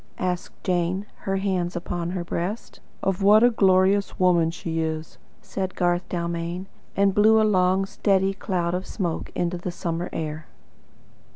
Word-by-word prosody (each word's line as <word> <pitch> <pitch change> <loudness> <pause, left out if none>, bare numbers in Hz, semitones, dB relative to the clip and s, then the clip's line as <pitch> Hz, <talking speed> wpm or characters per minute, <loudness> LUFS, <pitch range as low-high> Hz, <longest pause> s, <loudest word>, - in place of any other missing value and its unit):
asked 180 -1 -3
Jane, 180 +2 0 0.2
her 195 - +1
hands 185 -2 -1
upon 175 0 -3
her 180 -1 -3
breast. 175 +6 -4 0.2
"Of 195 0 0
what 210 +3 +6
a 245 - +6
glorious 195 -1 +3
woman 175 -3 +4
she 165 -1 -4
is," 160 0 -3 0.2
said 190 -1 -4
Garth 175 0 0
Dalmain, 170 +1 -3 0.3
and 200 -1 +3
blew 220 +2 +5
a 220 - +4
long, 190 -1 +3
steady 195 -1 +1
cloud 180 -3 -2
of 180 +1 -3
smoke 175 -6 -3
into 175 0 -1
the 180 - -4
summer 170 0 -3
air. 155 -1 -4
180 Hz, 155 wpm, -24 LUFS, 170-195 Hz, 0.3 s, what